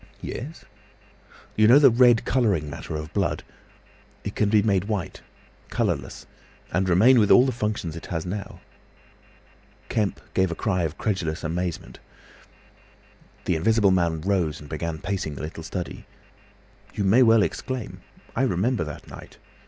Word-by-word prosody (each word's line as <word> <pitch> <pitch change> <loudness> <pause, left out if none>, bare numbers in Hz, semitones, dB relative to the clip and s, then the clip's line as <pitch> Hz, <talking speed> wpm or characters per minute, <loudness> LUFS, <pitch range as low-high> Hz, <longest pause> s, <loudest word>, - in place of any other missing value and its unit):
"Yes?" 150 +7 -7 0.9
"You 110 0 +5
know 125 +5 +8
the 145 -3 +7
red 120 -1 +5
colouring 105 - +1
matter 80 - -6
of 75 0 -6
blood; - - -1 0.8
it - - -4
can 105 - +1
be 105 -1 +4
made 100 -3 +1
white—colourless—and 95 -1 -5
remain 115 +9 +6
with 105 -2 +3
all 125 - +7
the 130 - +1
functions 105 -8 -3
it 85 - -8
has 80 -1 -3
now!" 100 +2 -6 1.3
Kemp 105 -3 -1
gave 95 -1 +2
a 85 - -4
cry 90 -2 -1
of 75 - -3
incredulous 85 -6 -2
amazement. 85 +1 -4 1.5
The 90 - +1
Invisible 105 +4 +3
Man 85 -3 +1
rose 90 -4 0
and 75 - -11
began 80 +2 -4
pacing 90 -4 -3
the 70 - -7
little 80 +2 -6
study. 90 +2 -6 0.9
"You 100 - -1
may 105 +7 +5
well 115 -3 +6
exclaim. 130 +1 -4 0.3
I 115 - 0
remember 120 -3 +1
that 75 -1 -8
night. - - -12
95 Hz, 145 wpm, -24 LUFS, 85-110 Hz, 1.5 s, know